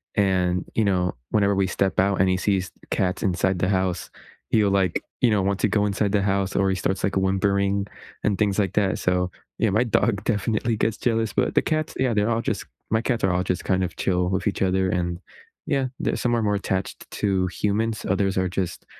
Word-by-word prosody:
and, 90 -3 +1
you 110 - +2
know, 90 -2 +1 0.2
whenever 100 -1 +3
we 95 -1 +2
step 95 +1 0
out, 95 +1 +2
and 95 - +3
he 95 - +2
sees 95 -1 0
the - - -20
cats 95 0 -1
inside 95 -1 +1
the 90 - +1
house, 95 -2 0 0.4
he'll, 105 -3 +3
like, 95 -3 +1 0.2
you 125 - +5
know, 105 -2 +2
want 100 +1 0
to - - +3
go 105 0 +1
inside 100 0 0
the 105 - +3
house, 100 -1 0
or 95 0 +2
he 95 - +1
starts, 95 +1 -2
like, 95 - 0
whimpering 100 +1 +1 0.4
and 105 -2 +1
things 100 -1 +1
like 95 -4 0
that. 100 -3 +1
So, 90 0 +1 0.3
yeah, 115 - +2
my 110 +5 +3
dog 110 -3 +1
definitely 110 +1 0
gets 110 0 +1
jealous, 115 -4 0
but - - 0
the - - +5
cats 155 0 -1
yeah, 130 -2 +2
they're 105 +1 +1
all 115 0 +1
just - - -2 0.2
my 110 +1 +2
cats 120 -1 -1
are 95 - +2
all 90 0 +1
just, 90 -1 -2
kind 95 -1 +1
of, 90 - -4
chill 90 -1 +1
with 95 -1 -1
each 100 - -1
other, 95 0 +2
and, 85 -1 -1 0.5
yeah, 135 -3 0
the - - 0
some 120 - 0
are - - 0
more 105 -1 +1
attached 95 -1 -3
to 95 -3 0
humans, 105 +3 -1
others 95 0 +1
are 95 0 +2
just 90 -1 -3
100 Hz, 225 wpm, -24 LUFS, 95-105 Hz, 0.5 s, you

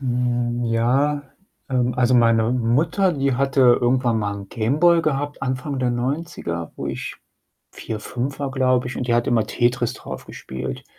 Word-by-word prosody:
Hm, 120 -2 -1
ja, 130 +6 +1 0.5
ähm, 125 -2 +1
also, 125 0 +3
meine 115 -1 +4
Mutter, 140 - +2
die 140 -3 0
hatte 135 +1 +1 0.2
irgendwann 120 -2 +2
mal 105 -1 -1
'n 100 -1 -8
Game 120 +8 -1
Boy 170 -1 +5
gehabt 145 -2 -2
Anfang 130 +1 -2
der 125 -1 +1
90er, 120 - -3
wo - - -5
ich - - -5 0.6
4, 110 -1 -6
5 130 +5 -4
war, 140 -2 -2
glaube 130 -2 +1
ich, 130 - -6
und 125 - -3
die 120 - +3
hat 120 0 +1
immer 115 -3 +2
Tetris 120 -1 0
drauf - - -8
gespielt. 65 0 -7
125 Hz, 170 wpm, -22 LUFS, 120-135 Hz, 0.6 s, Boy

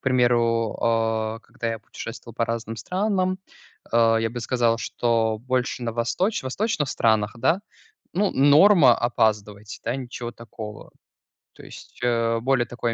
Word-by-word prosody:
К - - -67
примеру, 120 -3 +2
э, 110 -1 0
когда 115 - -7
я 115 0 -3
путешествовал 115 +1 -9
по 115 - 0
разным 115 -1 -4
странам, 185 - -1 0.5
э, 115 -1 +4
я 115 - 0
бы 120 +1 -5
сказал, 120 -2 +1
что 115 -2 0
больше 125 0 -2
на 115 -1 -2
восточ 125 - -1
восточных 150 - -1
странах, 110 -4 +1
да, 170 +10 +2 0.5
ну, 200 +2 +1
норма- 145 - +6
опаздывать, 105 -3 -1
да, 120 +3 -1
ничего 125 -2 -6
такого. 110 -2 -10 0.6
То - - -15
есть, - - -13
э, 115 -1 +1
более 125 0 +1
такой 120 -1 -3
115 Hz, 145 wpm, -24 LUFS, 115-130 Hz, 0.6 s, норма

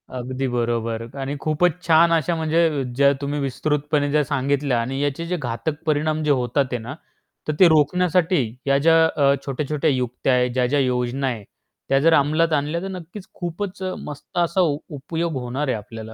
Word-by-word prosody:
अगदी 130 +2 -3
बरोबर. 115 -2 -2
आणि 135 +1 -3
खूपच 160 +3 +2 0.2
छान 165 +1 +5
अशा 165 +1 +1
म्हणजे 160 -2 +1
ज्या 140 0 +5
तुम्ही 145 +1 -2
विस्तृतपणे 145 +1 -1
ज्या 150 0 +3
सांगितल्या 140 -2 0
आणि 135 +3 -3
याचे 145 +3 -2
जे 180 0 -1
घातक 145 +4 -4
परिणाम 155 0 0
होतात 135 0 +2
आहे 125 - 0
ना, 120 +5 -7 0.5
तर 155 - 0
ते 185 - +8
रोखण्यासाठी 175 +2 +3 0.3
या 140 0 +4
ज्या 165 +3 +4
अ, 140 -3 +3
छोट्या-छोट्या 150 +3 -1
युक्त्या 125 0 0
आहेत, 125 0 +2
ज्या-ज्या 130 +3 +1
योजना 125 +1 0
आहे. 115 -5 -3 0.5
त्या 135 0 +4
जर 165 +3 +4
अंमलात 155 +3 +2
आणल्या 150 +3 0
तर 195 - -4
नक्कीच 185 +2 -9
खूपच 185 +2 -5
अ, 185 - -2
मस्त 150 +5 -9
असा 175 +2 +2
उपयोग 160 +1 -2
होणार 130 +4 -3
आहे 125 - 0
आपल्याला. 110 +1 -9
145 Hz, 170 wpm, -22 LUFS, 130-160 Hz, 0.5 s, ते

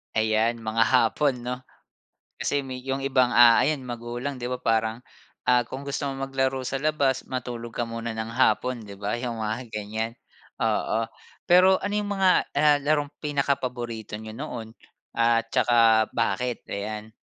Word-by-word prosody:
Ayan 110 +1 +1
mga 110 +1 +2
hapon, 125 +1 +2
'no? 125 +1 -2 0.8
Kasi 145 0 0
med 130 -1 -6
'yong 135 0 -2
ibang, 130 -2 +3
ah, 120 -1 +8
ayan 145 -2 +1
magulang, 120 +3 -5
'di 120 - -3
ba, 125 - -2
parang, 110 +1 0 0.5
ah, 125 -1 +5
kung 135 +2 -7
gusto 140 0 -2
mong 135 0 -4
maglaro 130 0 0
sa 135 +2 -2
labas, 145 -4 +1
matulog 120 -2 -5
ka 120 - 0
muna 115 0 -4
ng 110 +1 -4
hapon, 120 0 +1
'di 100 -1 -9
ba? 105 +3 -2
'Yong 120 -1 -3
mga 110 +1 -1 0.2
ganyan, 110 +2 -3 0.5
oo. 115 0 0 0.4
Pero 185 +2 +6
ano 205 0 -2
'yong 205 -1 -2
mga, 190 -1 +3 0.3
ah, 150 -1 +5
larong 145 -1 +1
pinakapaborito 125 -7 -2
niyo 110 0 -8
noon 115 -6 -6 0.4
at 115 0 +2
saka 115 -2 +4
bakit? 115 +2 -1
Ayan. 105 +2 -5
120 Hz, 155 wpm, -25 LUFS, 115-135 Hz, 0.8 s, ah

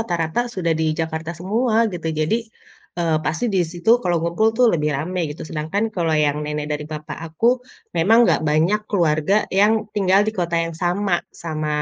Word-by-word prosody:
rata-rata 170 -2 -1
sudah 170 -3 0
di - - +1
Jakarta 160 +1 -3
semua, 220 +6 +1
gitu. 170 -2 -4
Jadi, 155 +6 0 0.6
eee, 165 -2 +1
pasti 160 - -1
di 190 - +2
situ 185 +8 +2
kalau 175 -7 0
ngumpul 170 +6 +2
tuh 250 +1 +5
lebih 150 -2 0
rame 180 +6 -3
gitu, 145 - -7
sedangkan 160 +7 -2
kalau 165 -2 +1
yang 145 0 0
nenek 150 0 -3
dari 150 0 -3
papah 155 0 -7
aku, 235 +11 +1 0.4
memang 220 +8 +5
nggak - - +2
banyak 165 +8 +2
keluarga 170 +1 +2 0.2
yang 210 +2 +5 0.2
tinggal 195 -1 +3
di 215 - -1
kota 175 -4 -1
yang 165 - -5
sama, 175 +2 0
sama 155 -2 -5
170 Hz, 180 wpm, -21 LUFS, 155-200 Hz, 0.6 s, tuh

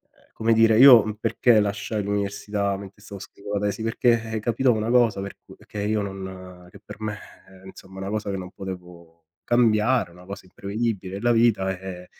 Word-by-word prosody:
Ehm, - - -29
come 115 +1 +1
dire, 115 -1 +4
io, 125 -3 +9
mhmm, 105 - -4
perché 115 0 +3
lasciai 105 +1 -2
l'università 100 0 -2
mentre 100 +1 -12
stavo 100 -1 -10
scrivo 100 +1 -9
la 100 - 0
tesi, 100 +2 -4
perché, 115 +1 +2
ehm, 110 -1 -4
capitò 120 +4 +1
una 110 0 -2
cosa 120 -5 +3
per 100 0 -7
c - - -18
perché 105 - -8
io 105 0 0
non 95 -2 -8
che 100 - -15
per 105 - -11
me, 105 -1 -4 0.3
ehm, 95 0 -17
insomma, 95 0 -12
una 95 0 -5
cosa 105 0 -3
che 100 - -2
non 90 -1 -8
potevo 90 -4 -10 0.2
cambiare, 120 -2 +2
una 90 +1 -16
cosa 100 0 -9
imprevedibile, 100 0 -4
è - - -6
la 120 +3 +2
vita, 110 -5 +2
ehm, 90 -1 -8
100 Hz, 200 wpm, -24 LUFS, 95-110 Hz, 0.3 s, io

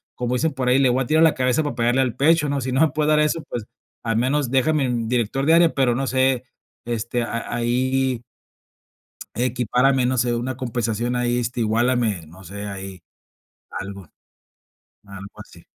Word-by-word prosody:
como 125 0 -2
dicen 160 +4 0
por 130 -2 -1
ahí: 130 +2 +4
"Le 130 -2 +4
voy 130 +2 +1
a - - -8
tirar 160 +1 +4
la 160 - +5
cabeza 125 +3 +1
para 145 - -3
pegarle 120 +2 +2
al 125 -2 -1
pecho", 150 +2 +3
¿no? 140 -1 -1
Si 130 +1 -3
no 130 +4 +1
me 160 - +5
puede 150 0 0
dar 150 0 +4
eso, 150 +1 +1
pues, 115 -3 -4 0.4
al 115 -1 0
menos 130 +2 +1
déjame 135 +2 +2
en 120 -2 -2
director 125 +3 0
de 160 - +4
área, 170 -1 +5
pero 130 -3 +2
no 135 +1 -1
sé, 130 -1 +1 0.4
este, 120 +1 -2
a 115 0 -4
ahí 125 +1 0 1.1
equipárame, 125 +1 +1
no 130 0 0
sé, 120 0 +1
una 120 +2 -3
compensación, 120 -1 -2
ahí, 120 0 0
este, 120 +1 -3
iguálame, 115 -5 +1
no 90 +4 -15
sé, 100 +3 -7
ahí, 95 -2 -8 0.7
algo 100 0 -7 1.0
algo 100 0 -11
así. - - -14
125 Hz, 185 wpm, -22 LUFS, 115-135 Hz, 1.1 s, la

